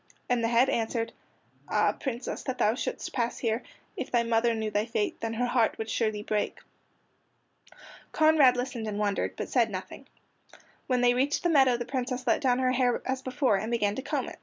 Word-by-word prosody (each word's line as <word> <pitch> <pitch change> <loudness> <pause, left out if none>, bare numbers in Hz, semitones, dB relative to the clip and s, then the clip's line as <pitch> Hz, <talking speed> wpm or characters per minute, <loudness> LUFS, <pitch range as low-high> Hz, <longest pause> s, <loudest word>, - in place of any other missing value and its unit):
And 245 -2 +1
the - - +2
head 240 +3 +4
answered: 230 -2 -1 0.6
"Ah, - - +3
Princess, 250 -2 -5
that 260 -2 -4
thou 215 - +3
shouldst 250 - -4
pass 235 -1 -1
here! 230 0 -1 0.3
If - - -4
thy 240 -1 +2
mother 230 0 +2
knew 220 -1 -2
thy 210 +2 0
fate, 220 -2 -2
Then 225 0 -2
her 245 +2 0
heart 240 -2 +1
would 220 0 -4
surely 215 -2 -1
break." 210 -1 -1 1.5
Conrad 310 -5 +5
listened 245 -3 -3
and 205 -1 -3
wondered, 205 -1 -1
but - - -5
said 235 -3 +2
nothing. 185 -2 -7 0.8
When 250 -2 +1
they 245 0 +5
reached 270 +4 0
the 350 - +2
meadow 265 -6 +4
the 240 - -4
Princess 255 0 -3
let 235 - +2
down 250 -2 +2
her 255 0 +2
hair 250 -1 +1
as 260 0 -2
before 255 -4 +1
and 215 +3 -3
began 210 -4 +1
to - - -4
comb - - -2
it. - - -10
240 Hz, 200 wpm, -28 LUFS, 225-255 Hz, 1.5 s, Conrad